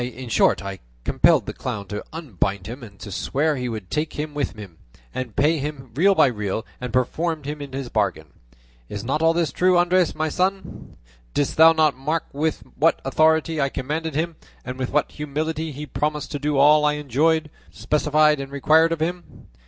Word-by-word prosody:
In 125 0 -6
short, 95 - +3
I 100 -1 -6 0.2
compelled - - +3
the - - -5
clown 100 -1 -5
to 105 0 -4
unbind 100 - -3
him, 120 +6 -7
and 100 -4 -12
to 100 - -8
swear 150 - 0
he 125 -2 -3
would 110 -5 -6
take 155 +1 -1
him 150 0 -4
with 145 -1 -2
him, 95 -6 -11 0.3
and 125 -4 -5
pay 155 +3 +2
him 135 -3 -6
real 190 - +4
by - - +6
real, 105 -4 -2
and 125 -1 -5
perfumed 155 +5 -1
into 140 -2 -5
the 120 - -9
bargain. 100 -7 0 0.6
Is 105 0 -5
not 140 +6 -1
all 165 0 +4
this 170 -5 +1
true, 180 +4 +3
Andres 175 0 +3
my 155 0 -1
son? 190 +5 -3 0.4
Didst 145 - 0
thou 160 +1 +8
not 155 -3 +3
mark 150 +5 -2
with 155 +3 -1
what 165 +3 +3
authority 160 +2 +2
I 135 - +1
commanded 150 +4 -3
him, 165 +1 -2 0.3
and 125 +1 -6
with 130 - -2
what 150 +1 0
humility 155 +2 -3
he 145 +2 -7
promised 150 0 -2
to 145 - -3
do 145 0 0
all 150 +2 +6
I 150 0 +3
enjoined, 150 +3 +1 0.2
specified, 150 0 +2
and 135 0 -6
required 160 +4 +4
of 165 -2 -2
him? 175 +2 -5
150 Hz, 190 wpm, -23 LUFS, 130-160 Hz, 0.6 s, thou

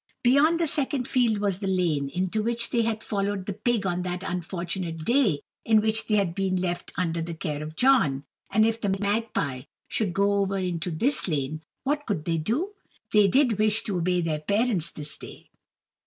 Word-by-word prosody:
Beyond 285 +7 +4
the 335 - +2
second 280 -4 0
field 240 -5 +2
was 200 -2 -1
the 200 - -3
lane, 170 -7 +1
into 185 +7 -1
which 235 +1 0
they 235 - +2
had 225 -1 -1
followed 200 -2 -2
the 200 - -3
pig 215 +1 0
on 180 -1 0
that 180 0 -4
unfortunate 175 -2 -4
day 235 - +3 0.2
in 220 -1 +4
which 220 +1 +2
they 215 - +2
had 195 -5 +1
been 190 0 0
left 180 -1 -2
under 170 -2 -1
the 165 0 -5
care 150 -2 -4
of 155 +1 -7
John; 155 - +3 0.3
and 215 +2 +4
if 225 0 0
the 195 -2 +1
magpie 205 - -1 0.3
should 210 -5 0
go 200 +2 +2
over 195 0 0
into 180 -2 -2
this 235 - +1
lane, 155 -1 -2 0.2
what 290 +2 -1
could 180 -8 -2
they 165 -1 0
do? 280 - -1 0.4
They 210 -1 +6
did 245 -1 +3
wish 215 +1 +3
to 195 -4 -2
obey 180 +1 +1
their 160 -2 -1
parents 200 0 0
this 150 -1 -5
day. - - -12
195 Hz, 195 wpm, -26 LUFS, 170-225 Hz, 0.4 s, They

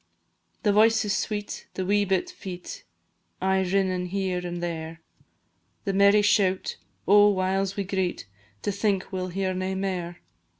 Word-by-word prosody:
The 205 - +3
voices 220 -1 +4
sweet, 205 -1 -4
the 185 - -2
wee 205 +2 +2
bit 190 -2 0
feet 180 -2 -8 0.5
Aye 190 0 +2
rinnin' 185 -1 0
here 190 -1 -1
and 175 -1 -5
there, 165 -1 -5 0.8
The 195 - -1
merry 200 +1 +5
shout 195 -2 +2 0.3
oh! 205 +1 +7
whiles 195 0 0
we 200 - -1
greet 185 - -2 0.4
To 205 - 0
think 200 -1 -1
we 185 - -2
'll 185 - -2
hear 185 +1 -2
nae 185 +1 -2
mair. 180 -3 -3
190 Hz, 145 wpm, -26 LUFS, 185-200 Hz, 0.8 s, oh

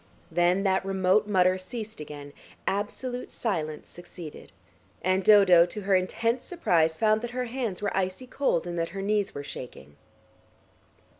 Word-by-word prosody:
Then 175 +2 +2
that 190 -1 +2
remote 190 +2 +2
mutter 185 -2 +3
ceased 220 +1 -7
again, 145 -1 -9 0.3
absolute 245 +5 -3
silence 155 -9 -3
succeeded, 175 -3 -11 0.5
and 185 +1 +2
Dodo, 185 -4 +7
to 210 - -6
her 195 0 0
intense 230 +6 +1
surprise, 165 - +1
found 215 +1 +3
that 240 - -4
her 250 - 0
hands 230 -6 -4
were 200 - -1
icy 190 +6 -2
cold 255 -10 0
and 175 -1 -3
that 165 - -1
her - - -2
knees 205 -1 0
were 140 - -5
shaking. 75 - -9
190 Hz, 150 wpm, -27 LUFS, 175-215 Hz, 0.5 s, Dodo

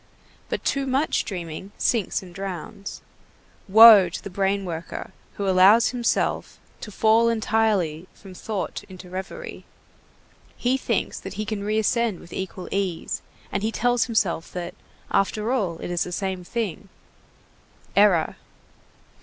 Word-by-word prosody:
But - - -3
too 275 -1 0
much 270 +4 +1
dreaming 180 0 -6
sinks 220 -4 0
and 180 -2 -12
drowns. 195 +1 -7 0.6
Woe 210 -2 +9
to 170 - -7
the 200 - -7
brain 195 +1 0
worker 170 -1 -6 0.2
who 200 - -2
allows 195 +5 +6
himself 240 -2 -1 0.2
to 210 - -8
fall 225 +3 +4
entirely 210 -7 +1
from 195 -2 -13
thought 200 +1 -4
into 185 -1 -11
reverie! 195 - -7 0.9
He 250 +2 +1
thinks 265 - -1
that - - -8
he 215 - -3
can 210 -2 -3
re 215 +1 0
ascend 220 -2 +1
with 170 - -13
equal 190 -1 -5
ease, 190 -4 -2 0.3
and 200 - -1
he 220 +2 0
tells 245 +1 +2
himself 195 -8 0
that, 180 0 -5 0.4
after 210 +3 +1
all, 195 -10 0
it 175 - -6
is 175 - +1
the 180 - -7
same 190 0 -3
thing. 200 -1 -4 1.1
Error! 200 -6 +4
200 Hz, 140 wpm, -24 LUFS, 185-225 Hz, 1.1 s, Woe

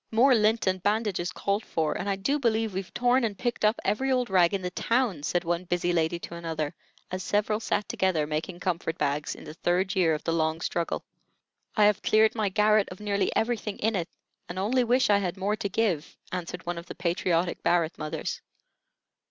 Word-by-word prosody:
"More 250 +4 +5
lint 220 0 +3
and 185 -1 0
bandages 205 -4 0
called 200 +3 -1
for, 155 -2 -1
and 200 - -3
I 195 - +1
do 275 +10 0
believe 225 -4 +1
we've 190 0 -4
torn 245 +1 +2
and 210 -4 -1
picked 240 -3 -2
up 215 +1 +3
every 260 +7 +1
old 250 -4 +1
rag 180 -3 +5
in 195 -2 -2
the 180 - -2
town," 230 - 0
said 175 +4 0
one 175 +1 -1
busy 175 0 0
lady 165 0 +1
to - - -7
another, 160 -2 -3 0.4
as 185 0 -3
several 210 +2 0
sat 210 -2 -1
together 180 -5 +1
making 155 +4 -4
comfort 170 -3 -2
bags 145 +1 -1
in - - -12
the - - -8
third 180 +4 0
year 170 -4 +3
of 150 - -7
the 165 - 0
long 160 0 0
struggle. 170 -1 -2 0.7
"I 210 - +5
have 210 -1 +3
cleared 220 0 +4
my 215 -3 0
garret 210 +1 +3
of 180 - -9
nearly 200 -2 0
everything 220 -3 -1
in 220 +1 0
it, 175 -3 -2 0.4
and 175 - -6
only 235 +7 +2
wish 245 -1 +3
I 200 - +5
had 185 -1 -3
more 200 +2 0
to 200 - -2
give," 180 -6 -1
answered 180 -1 -5
one 175 0 -3
of 170 - -12
the - - -8
patriotic 175 0 0
Barrett 170 -1 +1
mothers. 155 0 -4
190 Hz, 210 wpm, -27 LUFS, 170-215 Hz, 0.7 s, More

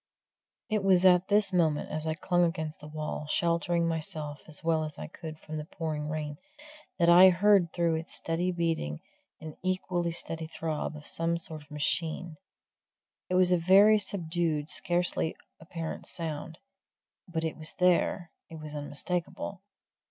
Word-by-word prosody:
It 215 -4 0
was 190 -1 +4
at 180 0 +6
this 205 -1 +2
moment, 160 -4 +1
as 155 +1 -3
I 160 - 0
clung 175 +2 +1
against 160 -2 -2
the 150 - -10
wall, 150 0 -5
sheltering 170 0 +1
myself 155 -2 -4
as 155 0 -4
well 160 -1 +2
as 155 -1 -6
I - - -6
could 160 -1 -9
from 155 0 -7
the 150 - -5
pouring 155 -2 -4
rain, 150 -1 -4 0.6
that 170 -2 +3
I 180 +2 +9
heard 185 -1 +4
through 170 -1 +1
its 160 +2 -6
steady 170 +2 -1
beating 165 - -2 0.4
an 155 -1 -9
equally 185 -2 -1
steady 165 -1 -3
throb 160 -1 -3
as 150 - -10
of - - -10
some 165 +1 0
sort 160 -2 +1
of 145 - -19
machine. 160 +2 -1 0.9
It 180 - 0
was 180 0 +4
a 180 - +5
very 200 +5 +6
subdued, 165 -6 -1
scarcely 175 -2 +1 0.2
apparent 165 -1 -6
sound, 160 -1 -5 0.7
but 165 -2 -3
it 160 - -2
was 155 -1 -4
there 180 -1 +2 0.2
it 165 - -9
was 155 -1 -8
unmistakable. 170 +6 -4
165 Hz, 160 wpm, -29 LUFS, 155-180 Hz, 0.9 s, I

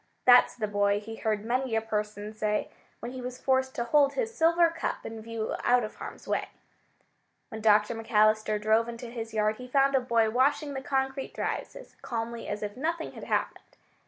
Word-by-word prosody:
"That's 245 0 +7
the 220 -3 -2
boy," 205 0 +1
he 225 +2 -9
heard 215 -1 -1
many 250 0 0
a - - +3
person 210 -1 -4
say 215 -1 -1 0.3
when 240 - -5
he 260 0 -7
was 250 0 -6
forced 260 0 +1
to 235 - -1
hold 280 +3 +3
his 460 -2 -2
silver 335 +1 +4
cup 330 - -4
in 225 0 -6
view 225 -1 -4
out 245 0 +4
of 215 - -6
harm's - - -9
way. - - -1 1.0
When 220 - -7
Dr. 210 0 +4
McAllister 215 -1 +2
drove 220 +2 +2
into 235 0 -7
his 225 -2 -6
yard 215 0 +1
he 250 - -9
found 275 +1 +3
a 265 - +5
boy 230 -3 +2
washing 285 +4 +1
the 265 - -4
concrete 265 0 -2
drives - - -3
as - - -12
calmly 230 0 -4
as 205 +1 -4
if 205 0 -4
nothing 325 +4 -2
had - - -9
happened. - - -3
230 Hz, 195 wpm, -28 LUFS, 215-265 Hz, 1.0 s, That's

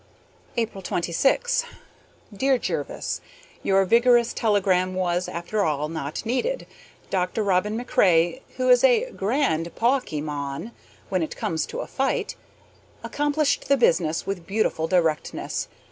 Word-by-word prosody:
April 225 -4 -2
26. 270 - +1 0.7
Dear 265 +5 +2
Jervis: - - -3 0.4
Your 195 0 +3
vigorous 235 +3 +4
telegram 190 -4 +1
was, 180 -1 0
after 185 +5 -2
all, 150 -2 -1
not 160 +3 -5
needed. 455 - -1 0.5
Dr. 190 +3 0
Robin 200 +2 +1
MacRae, 185 -3 +2 0.2
who 255 0 0
is 250 -1 +6
a - - +4
grand 190 - 0
PAWKY 235 - +1
mon 145 +6 -4 0.4
when 185 -2 0
it 160 - -4
comes 160 -1 -1
to - - -5
a - - -5
fight, 270 0 -1 0.7
accomplished 295 0 0
the 280 - +4
business 165 -8 +2
with 190 -4 -4
beautiful 195 -6 0
directness. 165 -4 0
195 Hz, 125 wpm, -24 LUFS, 170-250 Hz, 0.7 s, is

